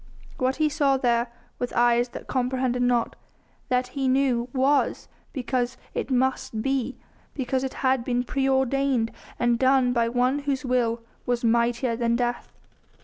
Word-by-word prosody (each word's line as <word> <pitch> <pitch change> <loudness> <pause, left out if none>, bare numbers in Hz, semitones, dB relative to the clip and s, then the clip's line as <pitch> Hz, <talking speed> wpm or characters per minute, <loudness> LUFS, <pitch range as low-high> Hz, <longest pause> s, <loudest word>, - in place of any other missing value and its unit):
What 260 +1 +1
he 310 0 +2
saw 285 -3 +2
there 235 -2 +1 0.3
with 245 - -2
eyes 240 0 +3
that - - -9
comprehended 255 -1 0
not 245 -1 +1 0.5
that 250 0 +1
he 270 -2 -2
knew 255 -2 +2
was 275 +2 +1 0.2
because 250 -2 -2 0.2
it - - -3
must 255 -4 0
be; 270 -1 -1 0.4
because 260 -1 -1
it 265 - -4
had 260 -2 +3
been 245 0 0
preordained 265 -2 +1 0.3
and 240 -1 +1
done 260 -1 +3
by 235 -1 +2
One 250 +3 +1
Whose 280 -2 -2
will 235 -2 0 0.2
was 245 -1 0
mightier 235 +1 +2
than 235 0 +1
death. 240 0 -2
250 Hz, 145 wpm, -25 LUFS, 240-265 Hz, 0.5 s, eyes